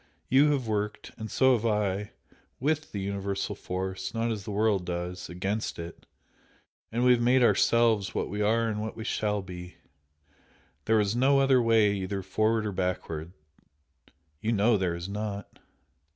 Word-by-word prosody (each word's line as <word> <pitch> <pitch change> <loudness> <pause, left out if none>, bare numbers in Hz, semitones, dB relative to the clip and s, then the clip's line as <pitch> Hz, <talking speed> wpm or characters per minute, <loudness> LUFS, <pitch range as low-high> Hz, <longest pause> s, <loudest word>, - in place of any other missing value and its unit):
You 140 +4 +5
have 135 -5 -1
worked 105 -1 -3
and 110 -1 -6
so 130 -1 +4
have 115 -3 0
I 105 -2 0 0.5
WITH 155 +3 -1
the 100 - -4
universal 100 0 -2
force, 95 +3 -4
not 115 +1 0
as 105 -3 -4
the - - -5
world 105 -2 +1
does, 90 0 -4
AGAINST 95 +5 -3
it, 85 0 -9 0.8
and 120 +2 0
we 125 - +7
have 120 -1 +4
made 125 +2 +4
OURSELVES 115 -4 +3
what - - -1
we 105 +2 -3
are 115 +2 +2
and 105 -1 -2
what 110 0 -5
we 110 - -5
SHALL 105 -2 -1
BE. 90 -1 -9 1.1
There 110 0 +3
is 105 +1 +1
no 135 +3 +4
other 135 -2 +4
way 110 -3 +4
either 95 0 -3
forward 110 +3 +1
or 105 - -1
backward, 90 -3 -3 1.1
you 110 - 0
know 110 +1 +3
there 90 -4 0
is 85 +1 -6
not!" 105 0 -5
105 Hz, 165 wpm, -28 LUFS, 95-115 Hz, 1.1 s, we